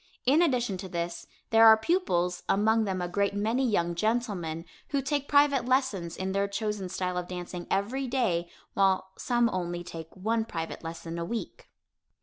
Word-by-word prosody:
In 285 +6 +5
addition 245 - +1
to 190 0 -7
this, 170 0 -4 0.2
there 225 0 +8
are 220 0 +9
pupils, 180 - 0
among 220 +2 +3
them 185 -2 -2
a - - -1
great 200 +2 0
many 225 +6 +1
young 175 -5 +1
gentlemen, 180 -5 -1 0.2
who 280 - 0
take 280 +1 -1
private 285 -3 +4
lessons 215 -11 0
in 190 0 -2
their 200 +1 +1
chosen 200 -2 -3
style 180 0 -2
of 175 - -6
dancing 180 -1 -6
every 245 +8 -1
day 180 -10 0 0.2
while 190 -1 +2
some 240 -1 +1
only 175 -1 -3
take 165 -2 -8
one 225 +4 0
private 165 -7 -5
lesson 165 0 -6
a - - -2
week. 225 +7 -5
200 Hz, 170 wpm, -28 LUFS, 175-235 Hz, 0.2 s, are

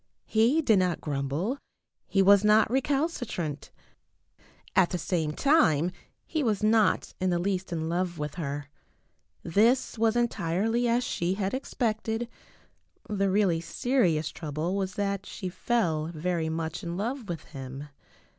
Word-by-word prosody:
He 235 +9 +3
did 220 -8 +4
not 180 -3 +1
grumble. 150 - -2 0.5
He 195 - +3
was 200 +1 +6
not 215 +1 +5
recalcitrant. 260 - -1 1.1
At 190 -2 +5
the 180 - -2
same 165 -3 -1
time 175 - +3 0.3
he 315 - -2
was 215 -6 0
not 215 -2 +3
in 185 - +2
the 175 - +1
least 185 +1 -2
in 160 -1 -2
love 175 0 -1
with 150 -1 -4
her. 145 -4 -5 0.7
This 225 +7 +2
was 225 0 +3
entirely 225 +1 +1
as 240 +1 +2
she 180 -5 -1
had 195 -1 -2
expected. 230 -3 -2 0.8
The 195 -1 +1
really 185 -4 +2
serious 175 - +1
trouble 155 +4 -3
was 190 -1 -2
that 200 -1 -2
she 185 -3 -5
fell 175 -7 0
very 165 0 -2
much 160 +2 -3
in 170 -2 -4
love 235 +2 -3
with 165 -3 -4
him. 135 +1 -7
190 Hz, 140 wpm, -28 LUFS, 165-225 Hz, 1.1 s, was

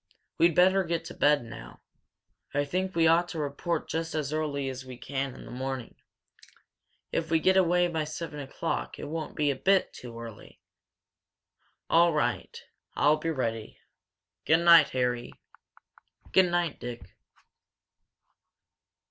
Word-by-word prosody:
We'd 170 -1 +4
better 190 +2 +5
get 170 -1 -2
to - - -8
bed 145 -2 +3
now. 115 -1 -11 0.8
I 145 0 +2
think 185 +5 -2
we 165 -1 +3
ought 165 +2 +4
to 165 - -6
report 150 +3 -2
just 160 +1 -3
as 150 -2 -2
early 145 -3 -2
as 130 -1 -5
we 130 -1 -10
can 135 +1 -4
in - - -11
the - - -10
morning. 130 -1 -5 1.2
If 160 - -2
we 165 - +3
get 190 +4 +3
away 175 -1 +4
by 160 -3 -2
seven 155 0 -6
o'clock, - - -4
it - - -7
won't 155 0 -5
be 150 -1 +2
a - - -3
bit 195 +8 +2
too 115 -2 -9
early." 115 -3 -11 1.3
"All 170 0 +4
right. 150 - -2 0.3
I'll 150 +2 +4
be 165 +2 -3
ready. 115 -7 -3 0.7
Good 160 +2 +3
night, 170 -2 +8
Harry!" 125 -1 -1 1.0
"Good 190 -1 +5
night, 175 -2 -1
Dick!" 120 -7 -8
150 Hz, 145 wpm, -28 LUFS, 130-170 Hz, 1.3 s, night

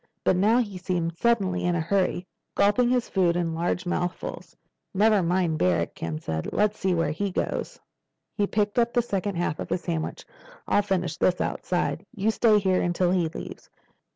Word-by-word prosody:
But - - +3
now 210 +6 +4
he 205 -7 -1
seemed 175 -2 -2
suddenly 200 -3 +1
in 175 0 +1
a - - 0
hurry, 185 +2 0 0.3
gulping 210 +5 +3
his 250 -1 +1
food 180 -3 +2
in 170 -2 -1
large 175 +2 -1
mouthfuls. 175 0 -4 0.4
"Never 210 0 +4
mind 170 -2 +1
Barrack," 90 -2 +1
Ken 80 -2 -4
said. 80 0 -4
"Let's 210 0 +1
see 185 -1 +1
where 165 -3 +1
he 200 +6 -2
goes." 180 - -3 0.6
He 205 -2 +1
picked 210 +2 0
up 235 0 +2
the 240 - +2
second 200 -3 -2
half 170 -3 -1
of - - -5
his 180 - -1
sandwich. 165 -3 -4 0.4
"I'll - - +3
finish 180 -5 -1
this 180 -1 +2
outside. - - -1
You 210 +2 +1
stay 220 -1 +4
here 190 -2 +2
until 175 0 +1
he 180 -3 +2
leaves." - - -9
185 Hz, 180 wpm, -26 LUFS, 170-205 Hz, 0.6 s, now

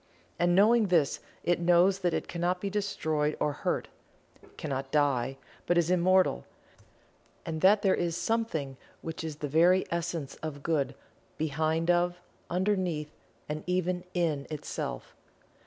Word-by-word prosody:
And 175 0 +3
knowing 215 +3 +5
this, 165 -6 +2 0.2
it 175 0 +2
knows 175 +3 +4
that 180 -2 +1
it - - -3
cannot 175 +1 -1
be 200 +1 -3
destroyed 160 -7 -1
or 150 -1 +1
hurt; - - -2 0.7
cannot 135 -3 -3
die, 135 -3 +1 0.3
but 175 - +3
is 170 0 +2
immortal; 185 +1 +3 1.0
and 160 -2 -4
that 200 +2 +5
there 195 - +4
is 170 -1 -1
Something 165 - -1 0.3
which 160 0 -5
is 160 -2 -4
the 145 0 -4
very 170 +6 +4
essence 170 -4 -3
of 145 -3 -6
Good 140 -5 0 0.4
behind 160 +2 +1
of, 175 0 +1 0.3
underneath 180 -5 0 0.4
and 150 +1 -4
even 180 0 0
in 155 -5 0
itself. 135 - -5
170 Hz, 140 wpm, -29 LUFS, 150-180 Hz, 1.0 s, knowing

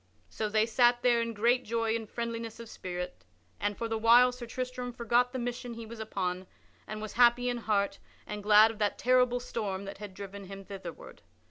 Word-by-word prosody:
So 215 -1 -2
they 215 +1 +3
sat 240 +1 +3
there 240 -2 +4
in 230 0 -2
great 240 +4 +3
joy 230 0 0
and 225 -2 -5
friendliness 230 -1 -4
of 230 -1 -9
spirit, 180 -2 -6 0.4
and, 205 0 -1
for 230 - -2
the 225 -1 -2
while, 240 +3 +6
Sir 245 -1 -8
Tristram 250 +1 -4
forgot 240 +1 +1
the 260 - -4
mission 245 0 -4
he 230 0 -7
was 225 +1 -10
upon 185 -4 -3 0.4
and 215 0 -5
was 215 - -6
happy 245 +1 +5
in 245 - -1
heart 205 -3 0 0.3
and 210 0 -5
glad 210 +2 +7
of 220 - -12
that 205 -1 0
terrible 250 0 +3
storm 205 -5 -4
that 195 0 -8
had 205 -3 -8
driven 200 0 -8
him 195 +1 -9
thitherward. 200 - -9
230 Hz, 205 wpm, -30 LUFS, 205-245 Hz, 0.4 s, glad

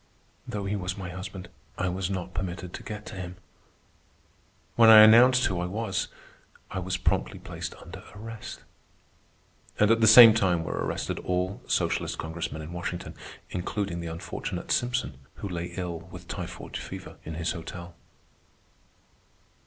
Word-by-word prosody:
Though 100 -1 -4
he 100 +1 -1
was 95 -1 -3
my 95 -2 -5
husband, 90 0 -7 0.3
I 95 - 0
was 90 +1 -2
not 95 -1 -4
permitted 90 0 -4
to - - -6
get 105 -1 -7
to - - -8
him. 90 -1 -6 1.4
When 115 -1 +7
I 110 -1 +11
announced 125 +3 +7
who 95 -4 0
I 90 - -1
was, 100 0 -2 0.6
I - - -2
was 95 0 -2
promptly - - 0
placed - - -7
under - - -11
arrest. 115 +1 -8 1.2
And 105 +1 +5
at 115 0 +3
the 110 - +6
same 115 0 +11
time 90 -6 +2
were - - -4
arrested - - -3
all 90 +2 -2
socialist - - 0
Congressmen 80 -1 -5
in 80 +3 -8
Washington, 90 0 -5 0.4
including 90 0 -3
the 85 - -5
unfortunate 80 0 -5
Simpson, 120 - 0 0.2
who - - -6
lay 85 -2 -3
ill 90 -2 -3
with 85 +3 -12
typhoid - - -6
fever - - -8
in 80 - -6
his 85 +1 -1
hotel. 85 0 -7
95 Hz, 155 wpm, -27 LUFS, 85-105 Hz, 1.4 s, I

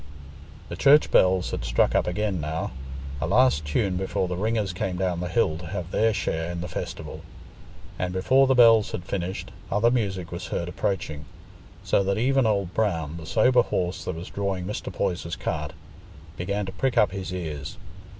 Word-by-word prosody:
The 85 - -5
church 145 +9 +5
bells 95 0 +4
had - - -3
struck - - +2
up - - +2
again 95 -1 -1
now—a 70 -2 -5
last 110 - +3
tune, 90 +6 0
before 95 0 -1
the 90 - -3
ringers 105 0 -1
came 90 0 -2
down 90 -2 -1
the 90 - -2
hill 90 -6 +1
to 85 - -8
have 90 0 -5
their 110 +1 +3
share 85 -4 -2
in 85 -1 -4
the 90 - -4
festival; - - -6 0.8
and 90 0 -1
before 130 +9 +3
the 130 - +3
bells 115 -3 +6
had 90 - -3
finished, 95 0 -4 0.2
other 110 +4 +3
music 95 -8 -1
was 90 +1 -5
heard 85 - -2
approaching, 80 -5 -3 0.6
so - - +2
that 95 0 0
even 130 +1 +3
Old 100 -4 0
Brown, 85 -7 -1
the 80 -1 -9
sober 125 +3 +4
horse 90 -5 -2
that 90 - -3
was 85 +2 -8
drawing 100 -3 -2
Mr. 105 - -4
Poyser's 85 -1 -2
cart, - - -3 0.6
began 100 +3 -2
to 95 - -5
prick 125 +6 -1
up 105 - +5
his 95 -1 -5
ears. 80 -4 -5
90 Hz, 180 wpm, -25 LUFS, 85-105 Hz, 0.8 s, bells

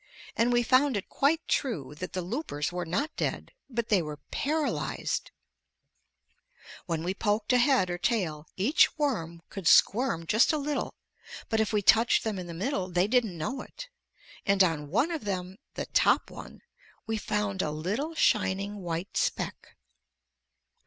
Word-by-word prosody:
And 235 +2 +2
we 240 0 +3
found 255 0 +3
it 195 - -6
quite 305 +4 +1
true 175 - -1
that 185 - -6
the 185 - -2
loopers 180 - -3
were 175 -1 -4
not 280 - -2
dead, - - -2 0.2
but 235 -3 -3
they 200 -4 +4
were 150 -2 -6
paralyzed! 280 - -1 1.6
When 165 -1 -2
we 180 +2 -1
poked 210 +3 0
a 250 - +5
head 245 -8 +3
or 175 - -3
tail, 165 -10 -1
each 255 - +3
worm 170 - -2
could 195 -5 -4
squirm 195 -6 +4
just 220 +6 +4
a 310 - 0
little, 290 0 -3 0.5
but 220 - +1
if 220 - +1
we 210 -2 +1
touched 225 +4 +5
them 215 -4 -2
in 180 - -6
the 170 - -7
middle, 190 - -2
they 180 +1 +2
didn't 220 -5 +1
know 255 - -3
it, - - -10 0.5
and 195 -1 +4
on 155 -5 -1
one 235 - +1
of 320 -6 -3
them, 185 -2 -4 0.2
the - - -3
top - - +2
one, - - -11 0.4
we 225 - -2
found 210 -2 -1
a - - -1
little 205 - -3
shining 200 -4 +1
white 175 0 -5
speck. - - -2
205 Hz, 165 wpm, -28 LUFS, 175-250 Hz, 1.6 s, a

